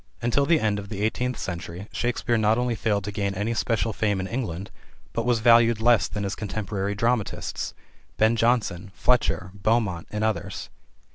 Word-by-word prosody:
Until 125 +4 +1
the 165 -2 +4
end 105 -2 +1
of 100 0 -8
the 100 -1 -4
eighteenth 125 +3 0
century 85 +2 -5
Shakespeare 120 0 0
not 110 0 +3
only 125 -1 +1
failed 105 -2 0
to 105 - -4
gain 100 -1 -2
any 105 +4 -1
special 115 -1 0
fame 105 -2 0
in 95 - -2
England, 95 -4 -4 0.4
but 115 +1 -1
was 120 -2 +2
valued 115 -1 +6
less 120 +1 +4
than 105 - -4
his 100 0 -2
contemporary 100 -1 -3
dramatists: 115 0 -1 0.4
Ben 110 +2 +4
Jonson, 115 -5 +1
Fletcher, 120 -6 +1
Beaumont, 100 -4 0
and 105 0 -3
others. 110 -1 -2
110 Hz, 170 wpm, -25 LUFS, 100-120 Hz, 0.4 s, valued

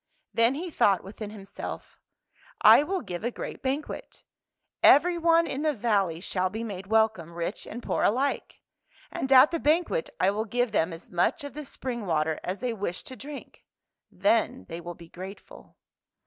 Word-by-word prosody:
Then 230 +3 +3
he 345 +4 -5
thought 195 - +3
within 205 +2 -8
himself, 200 -2 -8 0.3
" - - -40 0.2
I - - +9
will 370 +5 -2
give 180 -3 -6
a 240 - +1
great - - -7
banquet. 280 - -4 0.6
Everyone 335 +1 +5
in 275 -3 -3
the 305 -1 +1
valley 200 -7 +1
shall 185 -1 -1
be 220 +4 -5
made 195 -4 -6
welcome, 220 -6 +1
rich 170 +4 -4
and 240 +2 -7
poor - - -1
alike. 265 +6 0 0.5
And 265 - -3
at 265 +3 +8
the 335 - -1
banquet 345 +12 +1
I - - +4
will 215 +2 -2
give 245 +1 0
them 165 +2 +1
as 165 +1 -10
much 175 +9 +1
of 285 - -7
the 300 0 -7
spring 240 -5 -5
water 155 -1 0
as 185 +2 -4
they 245 -2 -1
wish 190 -4 -4
to 260 - -8
drink. 285 +2 -10 0.5
Then 225 +6 +1
they 165 0 -6
will 175 0 -7
be 170 - -13
grateful." 190 +4 -11
225 Hz, 175 wpm, -27 LUFS, 185-275 Hz, 0.6 s, I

